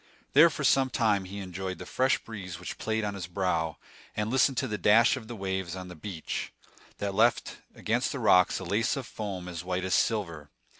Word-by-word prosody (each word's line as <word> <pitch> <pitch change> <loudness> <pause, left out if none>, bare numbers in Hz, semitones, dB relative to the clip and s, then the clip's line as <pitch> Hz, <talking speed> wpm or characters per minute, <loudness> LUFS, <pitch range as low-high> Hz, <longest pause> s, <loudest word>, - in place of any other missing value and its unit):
There 155 +4 +8
for 150 - -5
some 135 -1 +4
time 105 -6 +1
he 100 +2 -8
enjoyed 95 -1 -5
the 90 - -8
fresh 130 +7 +2
breeze 95 -6 -8
which - - -7
played 110 0 -1
on 105 -1 -2
his 95 -3 -6
brow, 85 -4 -1 0.4
and 105 +1 -1
listened 130 0 +3
to 130 - 0
the 105 -3 -3
dash 110 +6 +5
of 110 - -8
the 120 - -6
waves 95 -3 -3
on 90 -1 -7
the 90 - -9
beach, 85 0 -5 0.5
that 100 -1 -3
left 115 +4 +2 0.2
against - - 0
the - - -4
rocks 90 0 +4
a - - -5
lace 105 - +1
of 135 - -4
foam 100 -6 -6
as 85 -2 -6
white 90 +1 -2
as 95 - -1
silver. 85 -10 0
100 Hz, 210 wpm, -28 LUFS, 90-110 Hz, 0.5 s, There